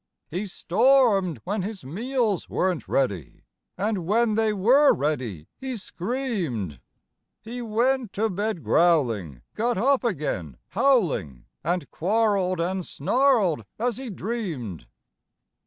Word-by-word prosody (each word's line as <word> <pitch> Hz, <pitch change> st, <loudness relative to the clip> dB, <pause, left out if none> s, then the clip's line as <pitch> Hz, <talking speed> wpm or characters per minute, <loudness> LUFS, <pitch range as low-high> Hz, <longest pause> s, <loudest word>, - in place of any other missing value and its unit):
He 185 Hz, +6 st, -3 dB
stormed 195 Hz, -, +3 dB
when 205 Hz, +1 st, -2 dB
his 195 Hz, -1 st, -5 dB
meals 220 Hz, -, -1 dB
weren't 185 Hz, -3 st, -1 dB
ready, 100 Hz, -, -1 dB, 0.3 s
And 200 Hz, -4 st, -1 dB
when 225 Hz, +2 st, +3 dB
they 220 Hz, 0 st, +2 dB
were 250 Hz, +9 st, +5 dB
ready, 125 Hz, -, -2 dB
he 260 Hz, -2 st, -4 dB
screamed. 180 Hz, -, -3 dB, 0.6 s
He 235 Hz, +3 st, -7 dB
went 240 Hz, +1 st, 0 dB
to 220 Hz, +2 st, +1 dB
bed 205 Hz, -2 st, -2 dB
growling, 115 Hz, -, +2 dB
got 240 Hz, +1 st, 0 dB
up 265 Hz, +6 st, +3 dB
again 135 Hz, -, -2 dB
howling 170 Hz, -, +1 dB, 0.2 s
And 175 Hz, +3 st, -2 dB
quarreled 195 Hz, -1 st, +1 dB
and 185 Hz, +2 st, -1 dB
snarled 205 Hz, -, +2 dB
as 240 Hz, 0 st, -1 dB
he 260 Hz, -1 st, -6 dB
dreamed. 175 Hz, -, -4 dB
195 Hz, 115 wpm, -25 LUFS, 155-235 Hz, 0.6 s, were